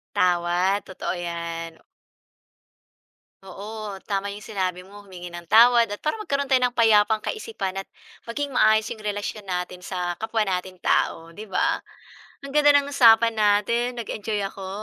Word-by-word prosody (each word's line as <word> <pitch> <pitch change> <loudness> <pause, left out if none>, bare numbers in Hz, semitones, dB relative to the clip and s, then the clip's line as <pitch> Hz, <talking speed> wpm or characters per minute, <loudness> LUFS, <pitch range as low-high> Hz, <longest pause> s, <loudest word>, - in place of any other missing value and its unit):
Tama, 180 +2 +2
totoo 190 - -4
'yan. 170 -1 -6 1.6
Oo, 205 +1 -7
tama 200 0 -2
'yong 205 - -8
sinabi 185 -3 -4
mo, 205 +1 -13
humingi 180 -3 -10
ng 175 0 -8
tawad 235 -1 +6
at 205 - -5
para 305 - -1
magkaroon 280 -11 -2
tayo 260 -1 +3
ng 250 - +2
payapang 220 -1 +4
kaisipan 430 - -4
at 195 0 -5 0.4
maging 275 +3 -4
maayos 215 -1 +4
'yong 215 - -7
relasyon 205 +1 -4
natin 180 -1 -4
sa 180 -1 -3
kapwa 220 +2 -1
natin 185 0 -3
tao, 165 -1 0
'di 210 - -8
ba? 325 - 0 0.6
Ang 275 - -7
ganda 290 -1 +5
ng 285 0 0
usapan 230 -3 +6
natin, 220 +3 +1
nag-enjoy 220 -2 -4
ako. 195 -1 -6
205 Hz, 150 wpm, -24 LUFS, 185-235 Hz, 1.6 s, tawad